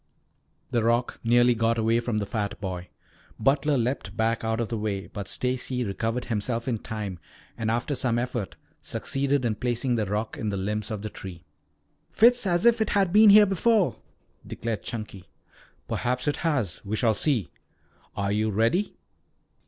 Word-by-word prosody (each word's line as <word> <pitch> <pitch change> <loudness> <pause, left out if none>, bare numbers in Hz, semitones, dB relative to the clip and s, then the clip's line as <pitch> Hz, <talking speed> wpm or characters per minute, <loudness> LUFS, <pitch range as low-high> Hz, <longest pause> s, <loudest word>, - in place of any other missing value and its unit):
The 120 -2 +1
rock 120 +2 +1
nearly 120 +1 +5
got 115 0 +1
away 115 +1 +2
from 120 -2 -2
the 105 - -1
fat 105 0 -3
boy. 90 -3 -5 0.5
Butler 140 +4 +2
leaped 115 -4 -2
back 115 0 +1
out 110 0 -1
of 115 - -1
the 115 - -2
way, 100 -2 -2
but 100 -2 -7
Stacy 125 0 -2
recovered 115 +3 -2
himself 115 +2 -2
in 115 -4 -1
time 105 -6 -5 0.4
and 110 -1 -2
after 120 +5 0
some 125 -3 0
effort 120 -4 -3 0.3
succeeded 140 -1 -1
in 115 - +1
placing 120 +2 -1
the 105 -3 -1
rock 105 +3 -2
in 110 - -2
the 100 - -2
limbs 105 +2 -2
of 105 -2 -4
the 105 - -5
tree. 90 -2 -9 0.6
"Fits 240 -1 +4
as 175 +1 +1
if 235 -1 +5
it 220 - +1
had 195 -3 +2
been 215 0 +8
here 210 +1 +9
before," 200 0 +2 0.5
declared 110 -5 -4
Chunky. 105 -5 -7 0.6
"Perhaps 125 +2 -2
it 145 - +1
has. 130 - -1
We 105 +1 -2
shall 115 0 +2
see. 115 - 0 0.7
Are 100 0 0
you 110 +1 +1
ready?" 115 - +1
115 Hz, 170 wpm, -26 LUFS, 105-130 Hz, 0.7 s, here